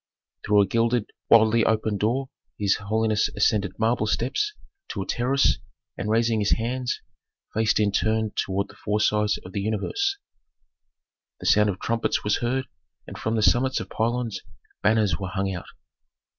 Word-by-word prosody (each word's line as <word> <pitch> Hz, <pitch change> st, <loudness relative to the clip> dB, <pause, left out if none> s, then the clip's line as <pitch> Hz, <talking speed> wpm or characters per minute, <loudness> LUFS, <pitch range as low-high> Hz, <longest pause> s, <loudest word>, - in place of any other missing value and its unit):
Through 105 Hz, 0 st, +4 dB
a -, -, 0 dB
gilded, 115 Hz, +2 st, 0 dB, 0.2 s
widely 115 Hz, 0 st, +6 dB
opened 110 Hz, -2 st, +1 dB
door 130 Hz, +6 st, 0 dB, 0.3 s
his 100 Hz, -2 st, +2 dB
holiness 110 Hz, +1 st, +1 dB
ascended 105 Hz, -2 st, +1 dB
marble 110 Hz, -1 st, +1 dB
steps 130 Hz, -, 0 dB, 0.4 s
to 100 Hz, -, -4 dB
a -, -, -11 dB
terrace, 130 Hz, +4 st, +2 dB, 0.4 s
and, 105 Hz, -, -4 dB
raising 115 Hz, 0 st, +2 dB
his 105 Hz, -, +2 dB
hands, 125 Hz, +2 st, -2 dB, 0.5 s
faced 110 Hz, 0 st, +2 dB
in 105 Hz, -1 st, +2 dB
turn 110 Hz, +1 st, +1 dB
toward 100 Hz, 0 st, -1 dB
the -, -, -15 dB
four 105 Hz, +1 st, 0 dB
sides 105 Hz, 0 st, +2 dB
of 90 Hz, -, -9 dB
the 100 Hz, -, -3 dB
universe. 255 Hz, -, -1 dB, 1.2 s
The -, -, -9 dB
sound 105 Hz, 0 st, +4 dB
of 95 Hz, -, -3 dB
trumpets 115 Hz, 0 st, -1 dB
was 105 Hz, -, +1 dB
heard, 130 Hz, +2 st, -1 dB, 0.4 s
and -, -, -9 dB
from 110 Hz, +1 st, -2 dB
the 110 Hz, -, +1 dB
summits 130 Hz, +4 st, +3 dB
of -, -, -8 dB
pylons 115 Hz, -2 st, -1 dB, 0.4 s
banners 105 Hz, -2 st, +2 dB
were 95 Hz, -2 st, -4 dB
hung 95 Hz, +1 st, -2 dB
out. 90 Hz, -, -7 dB
110 Hz, 160 wpm, -25 LUFS, 105-115 Hz, 1.2 s, widely